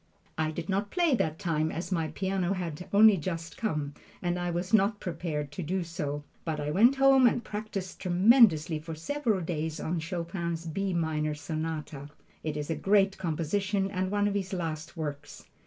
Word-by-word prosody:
I 160 Hz, -1 st, 0 dB
did 160 Hz, +1 st, -5 dB
not 200 Hz, +2 st, 0 dB
play 345 Hz, -5 st, +2 dB
that 160 Hz, -10 st, 0 dB
time 160 Hz, -4 st, 0 dB
as 170 Hz, +4 st, -5 dB
my 165 Hz, -3 st, 0 dB
piano 190 Hz, +1 st, -1 dB
had 180 Hz, -2 st, -5 dB
only 210 Hz, 0 st, +7 dB
just 165 Hz, 0 st, -4 dB
come, 150 Hz, -10 st, -2 dB, 0.3 s
and 175 Hz, 0 st, -1 dB
I 175 Hz, 0 st, -1 dB
was 175 Hz, +4 st, -3 dB
not 205 Hz, 0 st, +4 dB
prepared 160 Hz, -4 st, -3 dB
to 150 Hz, -, -5 dB
do 180 Hz, +3 st, -1 dB
so, 145 Hz, -4 st, -4 dB, 0.2 s
but 160 Hz, -2 st, -2 dB
I 145 Hz, 0 st, -2 dB
went 235 Hz, -, +5 dB
home 270 Hz, -1 st, +6 dB
and 240 Hz, 0 st, +1 dB
practised 205 Hz, -3 st, -5 dB
tremendously 180 Hz, -, +5 dB
for 160 Hz, +1 st, -7 dB
several 220 Hz, -, -1 dB
days 160 Hz, -1 st, -3 dB
on 170 Hz, +1 st, -2 dB
Chopin's 170 Hz, 0 st, -3 dB
"B 195 Hz, +4 st, -2 dB
minor 155 Hz, -2 st, 0 dB
sonata." 155 Hz, -1 st, -5 dB, 0.3 s
It 155 Hz, -1 st, -2 dB
is 150 Hz, +2 st, -3 dB
a -, -, 0 dB
great 195 Hz, +1 st, +3 dB
composition 190 Hz, +4 st, -1 dB
and 185 Hz, -1 st, -1 dB
one 205 Hz, 0 st, +1 dB
of 205 Hz, -, 0 dB
his 195 Hz, -1 st, -2 dB
last 160 Hz, -3 st, -4 dB
works. 145 Hz, -2 st, -6 dB
175 Hz, 180 wpm, -29 LUFS, 155-195 Hz, 0.3 s, only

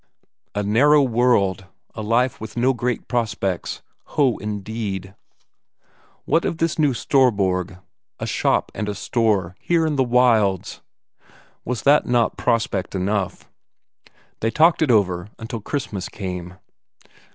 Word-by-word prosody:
A 105 Hz, -, 0 dB
narrow 140 Hz, +8 st, +4 dB
world, 115 Hz, -7 st, +1 dB, 0.3 s
a -, -, -6 dB
life 115 Hz, +3 st, +1 dB
with 110 Hz, +2 st, -8 dB
no 130 Hz, +3 st, +3 dB
great 125 Hz, 0 st, -3 dB
prospects? 105 Hz, -6 st, -2 dB, 0.3 s
Ho, 135 Hz, -6 st, +3 dB
indeed! 105 Hz, -2 st, -5 dB, 1.1 s
What 165 Hz, -, +2 dB
of 165 Hz, -, -2 dB
this 165 Hz, -1 st, -1 dB
new 145 Hz, -4 st, +3 dB
Storborg, 95 Hz, -10 st, +1 dB, 0.4 s
a -, -, -3 dB
shop -, -, 0 dB
and 105 Hz, -1 st, -3 dB
a 105 Hz, -, -3 dB
store 100 Hz, -4 st, 0 dB
here 170 Hz, -2 st, +1 dB
in 150 Hz, -2 st, -1 dB
the 135 Hz, -, +4 dB
wilds 120 Hz, -6 st, +2 dB, 0.8 s
was 125 Hz, -1 st, -4 dB
not 145 Hz, +1 st, +5 dB
that 120 Hz, -1 st, +2 dB
prospect 110 Hz, -6 st, -1 dB
enough? 95 Hz, 0 st, -2 dB, 0.9 s
They 115 Hz, -, 0 dB
talked 160 Hz, +8 st, +3 dB
it 155 Hz, -, +2 dB
over 95 Hz, -4 st, +2 dB
until 115 Hz, 0 st, -6 dB
Christmas 105 Hz, -7 st, -4 dB
came.... 90 Hz, -2 st, -6 dB
110 Hz, 130 wpm, -22 LUFS, 95-125 Hz, 1.1 s, not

